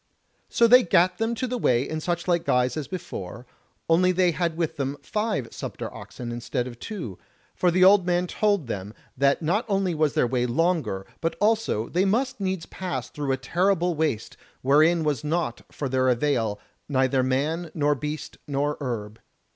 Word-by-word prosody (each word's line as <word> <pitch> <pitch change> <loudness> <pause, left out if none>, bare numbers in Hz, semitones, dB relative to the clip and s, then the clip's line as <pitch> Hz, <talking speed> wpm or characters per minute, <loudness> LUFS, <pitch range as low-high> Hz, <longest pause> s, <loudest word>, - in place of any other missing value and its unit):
So 235 - +4
they 250 +2 +8
gat 180 -2 +3
them 225 +1 0
to 255 - -2
the 250 0 -3
way 125 - +2
in 155 - -3
suchlike 175 +1 0
guise 125 -5 +1
as 155 -3 -4
before, 120 - -7 0.4
only 180 +3 +4
they 180 -1 +3
had 170 -1 -1
with 165 -1 -1
them 140 0 -2
five 210 - -2
sumpter - - -6
oxen 120 -1 -8
instead 120 +1 -3
of 120 -2 -9
two; 160 - -6 0.3
for 180 - +2
the 185 +2 +3
old 195 0 +7
man 175 0 +1
told 200 -2 +1
them 105 -2 -5 0.2
that 140 +4 +2
not 190 +9 +1
only 195 -3 +1
was 155 -2 +1
their - - +3
way 125 0 0
longer, 155 - 0 0.2
but 165 - -1
also 215 - +1
they 180 +2 +1
must 255 +6 0
needs 190 -3 -2
pass 185 -2 -5
through 145 -3 -3
a 130 - +1
terrible 175 +6 +1
waste, 155 -8 -2 0.3
wherein 155 +5 +4
was 145 -6 -1
naught 155 -5 -1
for 145 - -4
their 130 0 +2
avail, 120 -5 +1 0.3
neither 130 -1 +2
man, 150 +7 -1
nor 145 -2 +2
beast, 150 +2 -5
nor 145 +1 -1
herb. 115 -5 -4
155 Hz, 180 wpm, -25 LUFS, 130-180 Hz, 0.4 s, they